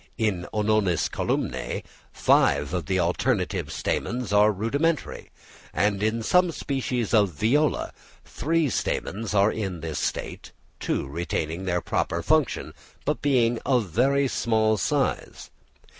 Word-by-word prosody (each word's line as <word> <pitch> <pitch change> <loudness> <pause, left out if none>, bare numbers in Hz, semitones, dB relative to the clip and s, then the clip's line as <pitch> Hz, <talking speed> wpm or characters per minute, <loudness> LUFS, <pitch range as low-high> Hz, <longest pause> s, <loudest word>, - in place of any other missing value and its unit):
In 105 -6 -1
Ononis 105 -5 +1
columnæ - - -2 0.3
five 70 +3 +2
of 90 -5 -2
the 95 - +1
alternate 90 0 0
stamens 120 -4 -2
are 105 +1 +5
rudimentary; 140 - -1 0.5
and 100 -1 +1
in 110 +2 0
some 180 +6 +3
species 130 -7 -2
of 105 -3 +5
Viola 135 - +1 0.3
three 165 0 0
stamens 110 -4 -2
are 100 +2 +4
in 95 -6 -4
this 80 -1 -4
state, - - -4 0.3
two - - -1
retaining 80 +3 -3
their 90 -1 0
proper - - -1
function, - - +1 0.3
but 150 - -1
being 120 -5 +2
of 125 -8 +1
very 135 - +2
small 110 -3 +1
size. 95 - -2
110 Hz, 125 wpm, -25 LUFS, 95-125 Hz, 0.5 s, are